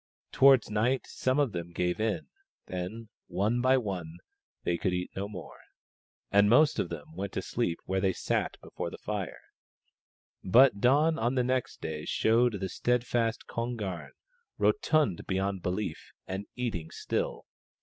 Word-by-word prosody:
Towards 135 -5 +6
night 120 +5 +1
some 130 +1 -1
of 145 -5 +2
them 85 -2 -5
gave 90 +3 0
in; 110 -1 0 0.4
then, 95 +5 -5 0.2
one 105 +7 0
by 130 +1 +5
one, 90 -8 -4 0.5
they 85 - +1
could 90 +2 -1
eat 90 0 -2
no 100 +1 -3
more, 90 -7 -9 0.7
and 100 +1 +5
most 145 +6 +5
of 85 - 0
them 80 -2 -8
went 100 +1 -4
to - - -1
sleep 115 -9 -1
where 95 0 0
they 95 -1 +3
sat - - -1
before - - -5
the - - -9
fire. - - -4 1.0
But 120 +2 +6
dawn 150 +6 +4
on 120 +3 +1
the 125 - +3
next 130 +1 -1
day 75 -1 -4
showed 115 +2 +3
the 95 -2 -3
steadfast 120 +1 0
Kon 120 +1 -3
garn, 95 -6 -5 0.4
rotund 155 - +2
beyond 95 0 -1
belief, 90 -2 -3
and 95 +2 -5
eating 110 -11 -3
still. - - -3
105 Hz, 155 wpm, -30 LUFS, 90-125 Hz, 1.0 s, Towards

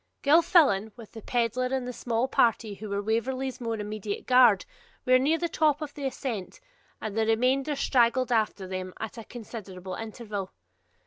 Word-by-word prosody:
Gilfillan, 285 - +4
with 230 -3 -12
the 225 - -10
pedlar 240 +2 0
and 260 -1 -2
the 250 - -4
small 235 +1 -1
party 230 -4 +2
who 210 +1 -8
were 200 0 -2
Waverley's 255 +4 -2
more 230 -1 -2
immediate 210 -1 -5
guard, 255 - +5 0.4
were 255 0 +5
near 300 +5 +2
the 340 - -1
top 305 -3 +2
of 305 -2 -6
the 280 -2 -3
ascent, 255 - -5 0.4
and 215 -2 -5
the 220 0 +1
remainder 260 +6 +2
straggled 255 -1 +2
after 215 -4 0
them 185 0 -5
at 220 +2 -6
a - - -7
considerable 200 -6 -8
interval. 215 -3 -6
230 Hz, 170 wpm, -27 LUFS, 215-260 Hz, 0.4 s, guard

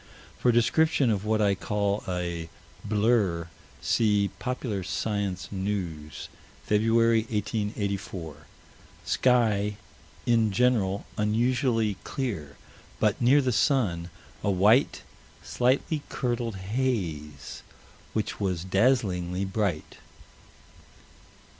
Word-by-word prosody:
For 125 - +4
description 130 +3 +3
of 105 -1 -1
what 110 0 +2
I 100 -1 +3
call 100 +1 -1
a 85 -2 -3 0.3
"blur," 105 -6 +1 0.3
see 105 -3 +2
Pop. 125 +1 -3
Sci. 100 -1 -2 0.2
News, 90 -8 -4 0.4
February, 115 +2 +3
1884 100 - -3 0.6
sky, 105 -5 +2 0.5
in 115 -3 +3
general, 100 -3 +1
unusually 115 -1 +1
clear, 95 - -4 0.4
but, 105 +1 +1
near 135 +4 +5
the 130 - +1
sun, 105 - +1 0.3
"a - - +1
white, 105 +8 +3 0.4
slightly 135 +5 +1
curdled 120 -3 -2
haze, 95 - -3 0.5
which 110 - -2
was 90 -4 -1
dazzlingly 95 -3 +1
bright." 95 -5 -2
105 Hz, 90 wpm, -27 LUFS, 95-120 Hz, 0.6 s, near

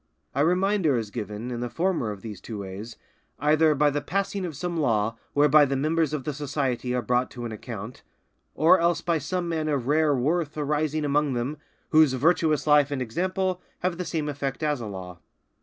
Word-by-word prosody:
A 140 - +2
reminder 180 -3 +2
is 110 -3 -4
given 110 +1 -5
in 120 - -3
the 120 0 -3
former 170 - 0
of 100 -2 -7
these 105 -4 -7
two 110 - -7
ways, 100 +4 -7 0.4
either 155 +1 +3
by 145 +1 +3
the 145 +1 -1
passing 195 +1 -2
of 160 - -7
some 175 +2 -3
law 115 -6 +1 0.2
whereby 150 +1 +6
the 135 -1 +1
members 155 +2 +1
of 150 -3 -3
the 150 - -3
society 135 -3 -2
are 125 - -1
brought 125 +3 +1
to 120 -1 -7
an 115 - -4
account; 110 +1 -7 0.5
or 160 +5 +5
else 170 0 +2
by 170 -2 0
some 175 +5 -2
man 160 -2 -1
of 140 -5 0
rare 150 +1 +3
worth 155 +4 0
arising 150 +1 0
among 145 -1 +1
them, 125 +5 -2 0.3
whose 155 -4 +5
virtuous 155 +2 +2
life 150 -2 +5
and 140 -2 -2
example 185 - -1 0.2
have 180 -1 -1
the - - -1
same 155 -3 -2
effect 140 0 -3
as 150 -4 0
a 110 - -5
law. 90 -3 -8
145 Hz, 200 wpm, -26 LUFS, 125-160 Hz, 0.5 s, whereby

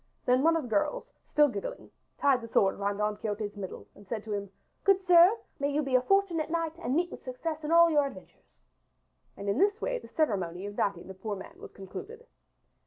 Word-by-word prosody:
Then 250 +1 +4
one 330 +3 +4
of 325 - -2
the - - -6
girls, - - -1
still 295 -1 +4
giggling, 205 -7 -6 0.3
tied 275 -3 +3
the 230 - -7
sword 195 -3 +3
about 200 0 -2
Don 210 0 -1
Quixote's 210 -1 -4
middle, 195 -2 -7
and 205 -1 -17
said 215 0 -4
to 215 - -5
him: 200 -1 -3 0.3
"Good 390 -1 +5
sir, 360 +3 +6 0.2
may 280 0 0
you 300 +2 0
be 270 -2 -4
a 255 - +5
fortunate 355 -1 +1
knight 330 -1 -1
and 280 -6 -1
meet 350 +1 +1
success 305 +5 -5
in 300 - -3
all 335 0 +7
your 295 -2 +3
adventures." 275 - -14 0.8
And 200 - -7
in 200 +6 +1
this 405 +2 +3
way - - -2
the - - -13
ceremony 190 - -1
of 205 - -6
knighting 195 -5 -1
the 190 - -8
poor 205 +2 -5
man 190 - -11
was - - -10
concluded. 435 - -9
265 Hz, 215 wpm, -29 LUFS, 205-335 Hz, 0.8 s, all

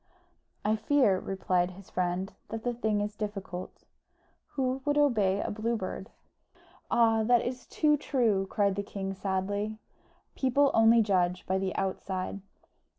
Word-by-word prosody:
"I 215 +1 +2
fear," 220 -4 +3
replied 185 -2 0
his 185 +1 -13
friend, 180 +2 -1 0.2
"that 225 0 -5
the 245 - 0
thing 220 -3 0
is 205 0 -3
difficult. 200 -4 -6 0.7
Who 265 -1 -1
would 290 +1 +1
obey 215 -10 +3
a - - -3
Blue 225 +3 -1
Bird?" 190 +1 -5 0.8
"Ah, 225 -2 +4
that 240 +2 +3
is 250 +1 -5
too 300 -1 +2
true!" 230 -9 +1
cried 200 -3 +2
the 200 - -2
king, 195 -1 -5
sadly, 200 +2 -2 0.6
"People 275 +2 +3
only 225 0 +6
judge 180 -3 +1
by 190 +1 0
the 190 -1 -2
outside." 190 0 -3
210 Hz, 145 wpm, -29 LUFS, 190-235 Hz, 0.8 s, only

